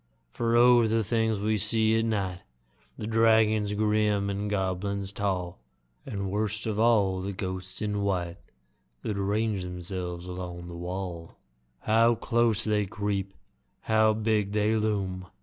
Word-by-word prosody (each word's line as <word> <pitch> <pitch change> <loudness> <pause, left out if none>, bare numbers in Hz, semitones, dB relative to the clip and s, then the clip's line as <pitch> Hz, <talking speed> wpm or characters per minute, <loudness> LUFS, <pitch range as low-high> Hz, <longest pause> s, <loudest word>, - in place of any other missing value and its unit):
For 115 - 0
O! 120 -1 +6
the 110 0 +1
things 110 0 0
we 105 +1 0
see 110 +2 +3
at 115 - 0
night 95 -5 -1 0.6
The - - -5
dragons 110 -2 +3
grim, 105 -1 +1
the 100 +1 -2
goblins 100 0 -2
tall, 95 -5 -2 0.5
And, 100 -2 -3
worst 105 +2 -2
of 110 -2 -2
all, 105 -5 +3
the 100 +2 -3
ghosts 95 0 -5
in 105 -1 -1
white 90 -3 -1 0.7
That 110 - -2
range 100 +1 0
themselves 90 -1 -5
along 90 -1 -6
the 85 - -8
wall! 90 -1 -6 0.5
How 115 +2 +4
close 115 -1 +1
they 105 -2 +1
creep! 100 -1 -3 0.5
How 110 -1 +3
big 105 -2 0
they 105 +1 +2
loom! 100 -4 -1
105 Hz, 140 wpm, -27 LUFS, 95-110 Hz, 0.7 s, O